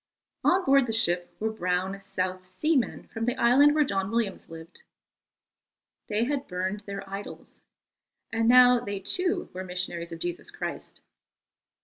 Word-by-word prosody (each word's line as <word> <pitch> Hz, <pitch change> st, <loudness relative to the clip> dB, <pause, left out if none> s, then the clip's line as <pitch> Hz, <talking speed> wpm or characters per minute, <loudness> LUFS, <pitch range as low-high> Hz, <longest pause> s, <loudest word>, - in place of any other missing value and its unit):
On 370 Hz, +1 st, +3 dB
board 275 Hz, -2 st, +4 dB
the 225 Hz, -, -2 dB
ship 175 Hz, -5 st, +1 dB
were 220 Hz, +1 st, -1 dB
brown 185 Hz, -1 st, -2 dB
South 185 Hz, -1 st, -4 dB
Sea 315 Hz, -, +2 dB
men 255 Hz, -, 0 dB
from 225 Hz, 0 st, -3 dB
the 245 Hz, +1 st, 0 dB
island 275 Hz, +5 st, +5 dB
where 305 Hz, -, +5 dB
John 195 Hz, -7 st, -1 dB
Williams 225 Hz, -3 st, -2 dB
lived. 165 Hz, +1 st, -11 dB, 1.3 s
They 215 Hz, +2 st, 0 dB
had 275 Hz, +2 st, -2 dB
burned 185 Hz, +3 st, -3 dB
their 195 Hz, 0 st, -6 dB
idols, 195 Hz, +1 st, -9 dB, 0.7 s
and 225 Hz, 0 st, +1 dB
now 250 Hz, 0 st, +7 dB
they 200 Hz, -3 st, -4 dB
too 355 Hz, -, -1 dB
were 185 Hz, +1 st, -5 dB
missionaries 180 Hz, -2 st, -4 dB
of 165 Hz, -, -6 dB
Jesus 175 Hz, +1 st, -4 dB
Christ. -, -, -7 dB
200 Hz, 150 wpm, -27 LUFS, 185-245 Hz, 1.3 s, now